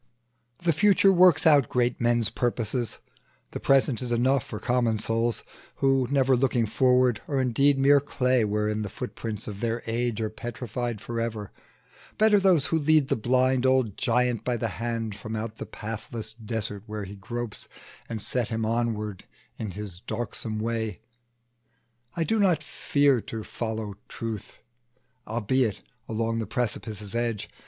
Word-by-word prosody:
The 170 -1 +3
future 195 +3 +5
works 180 -1 +5
out 145 -6 +6
great 125 -1 0
men's 120 -2 +2
destinies; 120 -1 -1 0.5
The - - -5
present 135 -3 +3
is 125 -1 -4
enough 130 +3 +2
for 105 - -7
common 120 -1 +1
souls, 115 +2 0 0.3
Who, 135 -2 +2
never 135 -2 +3
looking 125 -2 +2
forward, 125 +1 +3
are 140 -2 0
indeed 135 +3 +3
Mere 140 +1 +6
clay, 130 -3 +1
wherein 105 0 0
the 105 - -3
footprints 110 -2 -5
of 100 -2 -6
their 115 +1 -1
age 115 0 -1
Are 110 -1 -2
petrified 120 -1 -4
forever: 115 -3 -3 0.7
better 215 -1 +5
those 185 -7 +4
Who 165 - +1
lead 150 -2 +3
the - - +3
blind 130 +2 +2
old 130 -6 +2
giant 125 -1 +1
by 125 -1 0
the 115 0 -2
hand 115 +3 -3
From 110 +2 -6
out 110 0 -4
the - - -6
pathless 110 0 -6
desert 110 -2 -4
where 105 -1 -4
he 100 +1 -8
gropes, 120 +3 -5 0.4
And 110 -3 -4
set 125 -3 -1
him 110 -1 -1
onward 110 -3 -2 0.3
in 110 - -4
his 95 -2 -6
darksome 110 +1 -4
way. 110 -2 -2 1.1
I 170 - +1
do 220 +6 +1
not 180 -6 +3
fear 140 -4 +2
to 110 0 -6
follow 110 -2 -4
out 100 - -12
the - - -41
truth, 115 -3 -6 0.7
Albeit 115 0 0 0.3
along 115 +1 -1
the 110 - -3
precipice's 110 -3 -3
edge. 115 -3 -2
115 Hz, 155 wpm, -26 LUFS, 110-130 Hz, 1.1 s, out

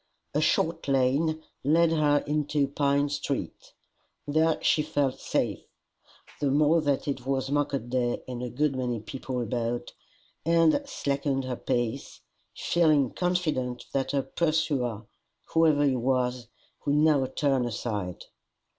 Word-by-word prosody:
A 150 - +1
short 165 +1 +1
lane 140 +4 +1 0.2
led 165 +3 +4
her 150 -2 +3
into 150 -1 0
Pine 140 0 +1
street. 140 -1 -4 0.5
There 155 +2 +2
she 155 - +3
felt 145 -4 -1
safe, - - -1 0.8
the 145 - +1
more 150 +4 +4
that 145 -2 0
it 140 -3 -2
was 135 0 -1
market 140 -4 -1
day 125 -2 0
and 125 -1 -5
a 125 - -3
good 140 +3 0
many 125 -3 -2
people 125 +4 -5
about, 120 +1 -3 0.5
and 165 - +4
slackened 140 - -1
her 130 -1 -3
pace, 120 +2 -2 0.4
feeling 155 -6 +3
confident 155 -9 -1
that 135 -1 0
her 140 -1 +1
pursuer, 145 -9 -1 0.5
whoever 155 -3 +4
he 135 -2 +2
was, 125 -1 0 0.4
would 145 - +1
now 150 -3 +4
turn 135 -1 +1
aside. 105 -5 -4
140 Hz, 130 wpm, -27 LUFS, 125-155 Hz, 0.8 s, led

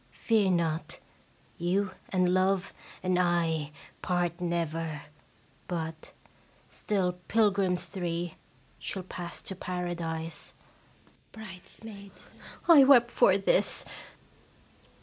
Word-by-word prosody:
Fear 215 -4 +4
not, 165 -2 -1 0.6
you 185 +3 0 0.2
and 180 -1 +2
Love 185 0 +1 0.3
and 185 -1 +2
I 165 -4 +1 0.3
part 175 -1 -1
never, 165 -3 -2 0.6
but, 160 -2 -5 0.6
still 180 -3 -1
pil 215 -2 +4
grims 185 -3 0
three, 175 -3 -3 0.5
shall 190 - -4
pass 175 -1 -7
to 190 - -4
Paradise. 170 -3 -4 0.8
Bridesmaid. 200 0 -11 0.6
I 320 -5 +9
wept 245 -3 +6
for 190 - +5
this! 195 - +2
180 Hz, 90 wpm, -29 LUFS, 170-195 Hz, 0.8 s, I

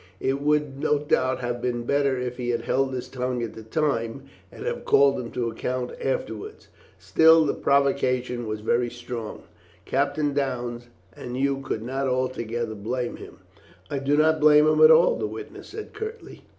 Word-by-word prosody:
"It 135 +1 -1
would 150 -2 0
no 150 - +2
doubt 130 -3 0
have 120 -1 -3
been 120 -1 -2
better 140 +1 +1
if 125 0 -4
he 120 -1 -3
had 120 -1 0
held 135 +2 +1
his 125 -2 -4
tongue 125 -2 -3
at 115 - -5
the 110 - -9
time, 115 0 -1 0.3
and - - -9
have - - -3
called 140 0 +4
him 120 -2 -5
to 120 -1 -1
account 125 +2 -3
afterwards." 110 -5 -4 0.3
"Still 160 - +5
the 145 - +1
provocation 130 -3 +1
was 110 0 -4
very 120 +2 +1
strong, 120 -2 -7 0.4
Captain 145 +1 0
Downes, 120 -4 -3 0.3
and 125 0 -6
you 135 0 +1
could 110 -5 -4
not 135 +3 -2
altogether 120 -3 -2
blame 120 +4 -3
him." - - -12 0.5
"I 140 - -1
did 140 +2 +1
not 155 +1 +4
blame 150 0 +7
him 155 0 +3
at 155 - +9
all," 160 +2 +6
the 110 - -2
witness 110 +1 -9
said 435 +1 -8
curtly. 440 +1 -8
130 Hz, 175 wpm, -25 LUFS, 120-140 Hz, 0.5 s, at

